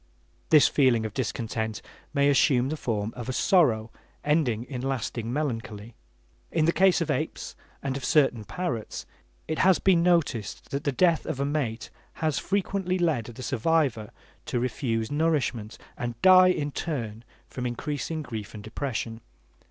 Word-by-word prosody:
This 155 -2 +7
feeling 125 -6 +3
of 110 - -5
discontent 110 -3 -3 0.3
may 140 -1 +2
assume 135 -2 +3
the 155 - -2
form 110 -6 -2
of 125 0 -6
a - - -1
sorrow 125 - +3 0.3
ending 145 -7 +1
in 125 -1 -6
lasting 120 -3 -3
melancholy. 115 -6 -3 0.6
In 160 -2 +2
the 165 - +4
case 190 0 +4
of 160 -2 0
apes 155 +3 -3 0.3
and 135 -1 -2
of 135 - -5
certain 135 -7 +3
parrots, 120 - -4 0.4
it 155 - -2
has 185 -1 +5
been 185 -3 +3
noticed 160 - 0
that 140 +3 -3
the 140 - +2
death 165 +3 +2
of 135 - -3
a 140 - +1
mate 140 -6 -2 0.2
has 155 -3 -1
frequently 190 -1 -1
led 160 -10 +1
the 120 +2 -9
survivor 130 -3 +1 0.4
to 120 - -1
refuse 115 -1 -2
nourishment, 145 -8 0 0.2
and 120 -1 -5
die 185 -1 +8
in 145 -5 0
turn 115 -9 -4 0.2
from 125 -1 -4
increasing 150 +5 -3
grief 110 -5 -7
and 105 - -8
depression. 115 0 -4
135 Hz, 155 wpm, -27 LUFS, 115-155 Hz, 0.6 s, die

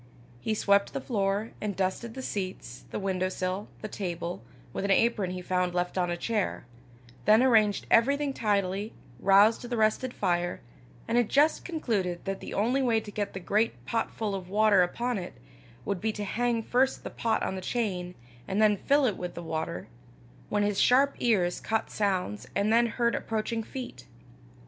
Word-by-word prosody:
He 215 - -1
swept 200 -1 +2
the - - -2
floor, 205 -3 -1
and 210 -2 -2
dusted 195 +5 -2
the 260 - -6
seats, 185 - -5
the - - -4
window 185 -2 -1
sill, 185 +2 -3 0.2
the - - -2
table, 175 - -4 0.3
with - - -3
an 200 - -1
apron 205 -1 +3
he 180 0 -5
found 180 -1 0
left 180 0 -1
on 180 -2 +1
a 175 - -1
chair, 210 - -2 0.6
then 220 +4 +6
arranged 215 -5 +4
everything 280 +4 +3
tidily, 205 -2 0 0.3
roused 200 +3 +5
the 240 -1 -4
rested 220 +4 +1
fire, 175 -5 -1 0.5
and 235 +1 +3
had 240 - +1
just 295 +3 +3
concluded 210 - -2
that 195 0 -3
the - - -8
only 245 +7 +1
way 235 -4 +3
to 210 -1 -9
get 205 -1 -3
the 190 - -5
great 210 +5 0
pot 225 -1 -1
full 215 -3 -3
of 185 -2 -5
water 210 -1 +4
upon 235 +6 0
it, 180 - -7 0.5
would 200 -3 -2
be 220 +1 +1
to 210 - -4
hang 235 +2 0
first 260 +4 +1
the - - -6
pot 225 -1 0
on - - -1
the 190 - -5
chain, 180 -5 -2 0.3
and 195 - -1
then 210 -1 +4
fill 285 +6 +3
it 215 -6 0
with 180 -1 -5
the 170 - -6
water, 160 -1 -4 0.6
when 205 0 +1
his 205 -1 +1
sharp 275 +3 +5
ears 190 -7 +1
caught 220 0 -1
sounds 180 - -1
and 205 +2 +2
then 235 +1 +5
heard 235 +1 0
approaching 225 +1 -2
feet. 225 - -8
205 Hz, 185 wpm, -28 LUFS, 185-230 Hz, 0.6 s, then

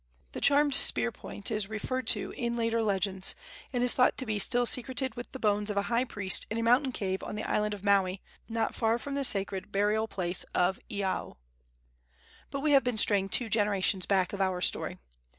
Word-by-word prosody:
The - - -7
charmed 285 0 +4
spear 115 - +5
point 205 - -5
is 210 -2 -1
referred 255 +4 -4
to - - 0
in 235 -1 -3
later 230 0 0
legends, 195 -2 0 0.4
and 245 -2 -1
is 250 - +4
thought 250 - +2
to 260 - -2
be 215 -2 -2
still 245 +4 +1
secreted 260 +2 +1
with 240 0 -9
the - - -7
bones 210 -3 0
of 205 - -3
a 200 - +1
high 240 +2 +2
priest 205 -6 +2
in 225 - -3
a 230 - -1
mountain 250 +3 +3
cave 190 -5 -3
on - - -6
the 210 - -4
island 210 0 -1
of 200 - -13
Maui, 195 -2 +2 0.3
not 225 -1 -2
far 225 0 0
from 280 +4 -7
the 280 0 -2
sacred 195 -5 0
burial 210 +2 0
place 180 -3 -3
of 180 +2 +1
Iao. 200 -2 -3 1.1
But 275 - -5
we 300 +1 +1
have 275 -2 +5
been 245 -2 -2
straying 200 -3 +4
two 240 - +1
generations 205 -3 0
back 190 -2 +1
of 200 - -3
our 185 -1 0
story. - - -3
215 Hz, 205 wpm, -29 LUFS, 195-245 Hz, 1.1 s, spear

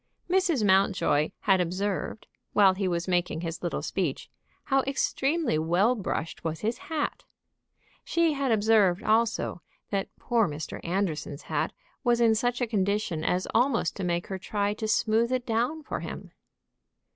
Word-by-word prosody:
Mrs. 350 - +2
Mountjoy 190 -6 +3
had 190 -3 +3
observed, 190 +4 -2 0.3
while 195 -2 +6
he 190 0 -1
was 175 0 -1
making 175 -3 0
his 165 -1 -5
little 175 - -2
speech, - - -2 0.3
how 270 -1 +2
extremely 275 - 0
well 175 +9 +3
brushed 175 -7 -4
was 160 -1 -3
his 225 +3 -1
hat. 310 -2 -2 0.8
She 335 -2 +2
had 275 -3 0
observed, 210 -3 +3
also, 220 -5 +1 0.3
that 195 -1 -1
poor 230 -4 +1
Mr. 150 0 -6
Anderson's 170 -5 -2
hat - - -1 0.3
was 240 -2 +3
in 230 -2 +5
such 245 +3 0
a - - +3
condition 200 -6 -1
as 180 +3 0
almost 240 -6 +2
to 195 - -3
make 175 -1 -1
her 190 -1 -5
try 205 +2 -1
to 220 +1 -4
smooth 225 +2 +2
it 255 -1 0
down 250 +7 -1
for - - -4
him. - - -7
205 Hz, 155 wpm, -27 LUFS, 180-240 Hz, 0.8 s, while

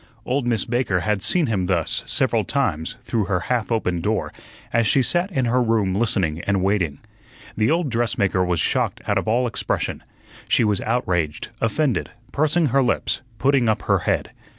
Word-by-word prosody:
Old 130 0 -1
Miss 115 -5 +1
Baker 120 -7 0
had 105 +1 0
seen 175 - +2
him 100 -7 -1
thus 85 -4 +1
several - - +1
times 80 +8 -1
through 110 -4 -1
her 90 -2 0
half 120 +3 -1
open 90 -7 0
door, - - -1 0.4
as 115 -1 +3
she 130 +7 +4
sat 175 +9 +2
in 130 -7 0
her 125 +2 +2
room 110 -5 +1
listening 95 -7 0
and 100 -2 +1
waiting. 90 -7 0 0.6
The 110 0 +1
old 160 -3 +1
dressmaker 110 -5 +1
was 90 -2 0
shocked - - 0
out - - +1
of - - -6
all 120 +3 +2
expression. 120 - -2 0.5
She - - +3
was 105 -3 +1
outraged, 90 -10 -1
offended, 125 +5 0 0.2
pursing 155 +3 +2
her 135 +3 +3
lips, 125 - 0 0.2
putting 135 -3 +2
up 110 -1 0
her - - +2
head. - - -1
110 Hz, 175 wpm, -22 LUFS, 95-125 Hz, 0.6 s, she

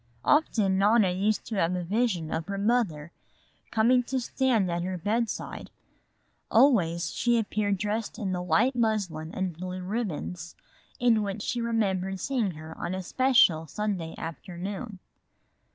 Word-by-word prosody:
Often 215 -11 +3
Nona 205 -1 +4
used 200 +4 0
to 220 - -4
have 180 0 +1
a 180 - -2
vision 190 -4 0
of 160 +1 -3
her 200 0 -3
mother 200 -8 0 0.6
coming 235 +3 +4
to 260 +1 -1
stand 240 -6 +1
at 170 0 -1
her 185 +1 -3
bedside. 220 +6 -2 0.8
Always 200 - +3
she 240 -1 +1
appeared 205 -2 0
dressed 210 +3 -3
in 200 -5 -2
the 180 -1 -2
white 195 +10 +2
muslin 200 -9 -1
and 190 -2 -2
blue 185 +2 -6
ribbons, 180 -5 -4 0.4
in 235 -3 +4
which 200 0 -3
she 240 - -2
remembered 195 -5 0
seeing 240 -1 0
her 155 +1 -9
on 180 - -3
a 190 - -4
special 235 -8 +3
Sunday 185 -2 -3
afternoon. 190 +6 -6
200 Hz, 145 wpm, -27 LUFS, 180-230 Hz, 0.8 s, Nona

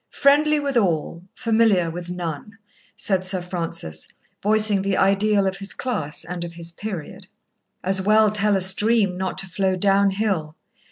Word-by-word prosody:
Friendly 295 +2 +3
with 280 -3 -1
all, 170 -5 0
familiar 220 -7 +2
with 175 +1 -7
none," 180 +4 -6 0.4
said 190 -2 0
Sir 185 0 +1
Francis, 170 - -4 0.3
voicing 215 -1 +2
the 195 -1 -1
ideal 200 +1 +3
of 190 0 -1
his 195 0 -4
class 205 - -3
and 175 0 -5
of 170 -1 -7
his 170 0 -4
period. 190 0 -7 0.6
As 190 +1 +1
well 215 +2 +4
tell 210 -1 +2
a 190 - +1
stream 200 +1 +2
not 190 +1 -3
to 195 - -1
flow 190 0 0
downhill. 195 -4 +1
195 Hz, 155 wpm, -22 LUFS, 175-215 Hz, 0.6 s, well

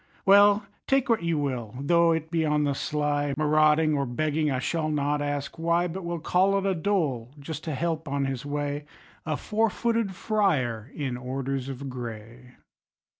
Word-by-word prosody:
Well, 205 +1 +6 0.2
take 270 -1 +2
what 230 -4 +3
you 170 -1 0
will, 125 -6 -3
though 170 +4 +4
it 160 0 -2
be 165 -1 +1
on 150 -1 +2
the 145 -1 +1
sly, 145 0 -1
Marauding 155 +1 +4
or 140 -1 0
begging, 155 +4 0
I 130 - 0
shall 155 +4 -1
not 145 -1 0
ask 145 +1 -3
why, 170 +2 +2
But 180 +2 -6
will 170 0 -3
call 190 +5 +2
it 195 - -1
a 195 - +2
dole, 160 - -1
just 155 +2 -6
to 155 -3 -2
help 160 +2 -2
on 140 0 -1
his 135 -2 -3
way 145 0 -3 0.4
A 155 -2 0
four 225 +1 +1
footed 230 -4 -1
friar 135 - 0
in 135 -4 -3
orders 135 +1 -3
of 135 +1 -6
gray! 120 0 -8
150 Hz, 175 wpm, -26 LUFS, 135-170 Hz, 0.4 s, Well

